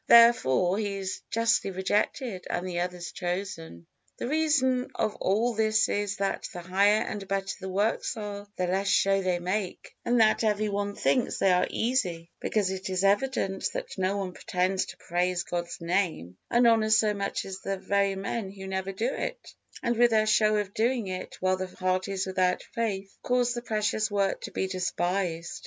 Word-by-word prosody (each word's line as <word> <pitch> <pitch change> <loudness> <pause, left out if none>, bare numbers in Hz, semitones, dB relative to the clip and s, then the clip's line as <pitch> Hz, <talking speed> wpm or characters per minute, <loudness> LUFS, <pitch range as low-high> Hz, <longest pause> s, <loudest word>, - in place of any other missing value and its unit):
Therefore 195 - +6
he 205 -2 -2
is 190 -1 -4
justly 230 -2 +2
rejected 195 +3 -1
and 180 +1 -2
the 175 -1 -2
other 180 0 -2
chosen. 175 - -5 0.3
The - - -3
reason 265 -4 +2
of 215 - 0
all 225 +6 +1
this 220 0 +2
is 205 -1 -1
that 195 0 -2
the 175 - -7
higher 200 +4 +3
and 200 -2 -5
better 195 0 -2
the 190 - -5
works 205 +5 0
are, 205 -1 -6
the 185 - 0
less 190 +2 0
show 195 0 +3
they 185 -2 +1
make; 185 +2 -3
and 240 0 +2
that 220 0 +4
every 215 -1 +1
one 205 0 -2
thinks 250 +2 +1
they 195 - +3
are 180 0 +3
easy, 180 -9 -1
because 205 -3 0
it 190 0 -4
is 185 0 0
evident 200 -1 +1
that - - -5
no 190 +2 0
one 195 -2 -3
pretends 185 +1 0
to 175 - -10
praise 175 +1 -1
God's 170 -1 -4
Name 170 - -1
and 240 +1 +4
honor 225 -2 +4
so 215 -1 +4
much 200 -1 -3
as 190 -1 -6
the 195 0 -3
very 200 0 +1
men 195 +1 -3
who 190 0 -9
never 190 0 -3
do 195 +4 -2
it - - -5 0.3
and 235 - +1
with 240 +1 +5
their 215 -1 +3
show 215 0 +4
of 205 -1 -2
doing 235 0 +1
it, 185 0 -6
while 185 0 +2
the 185 0 -3
heart 185 0 -1
is 195 -1 -2
without 185 -1 +1
faith, 195 -4 -2
cause 245 -1 +1
the 240 - -4
precious 215 -1 0
work 200 -2 0
to - - -6
be - - -1
despised. 180 -2 -2
195 Hz, 185 wpm, -28 LUFS, 185-220 Hz, 0.3 s, Therefore